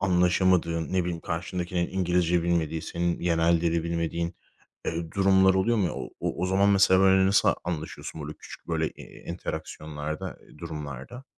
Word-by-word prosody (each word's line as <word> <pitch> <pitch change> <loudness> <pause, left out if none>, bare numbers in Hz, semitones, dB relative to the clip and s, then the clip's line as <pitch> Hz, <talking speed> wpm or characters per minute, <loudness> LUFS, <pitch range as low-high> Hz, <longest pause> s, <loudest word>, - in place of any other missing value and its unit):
anlaşamadığın, 90 -3 +2
ne 95 - +3
bileyim, 85 -1 -3
karşındakinin 85 +1 -2
İngilizce 90 -2 +1
bilmediği, 80 -2 0
senin 85 0 -2
yerel 85 -1 +2
dili 85 -1 +1
bilmediğin, 85 0 -2 0.5
eee, 85 0 -3
durumlar 95 -1 +4
oluyor 110 +5 +2
mu? 100 -5 +2
O 65 -2 -6
o - - -2
o - - +2
zaman 95 +2 +3
mesela, 95 -2 +5
böyle, 95 0 +5
nasıl 100 +1 +4 0.2
anlaşıyorsun, 80 -1 -5
böyle, 75 +1 -5
küçük, - - -12
böyle, 80 -1 0
eee, - - -11
interaksiyonlarda, 80 -3 -5
eee, - - -19
durumlarda? 75 - -7
85 Hz, 155 wpm, -27 LUFS, 80-95 Hz, 0.5 s, mesela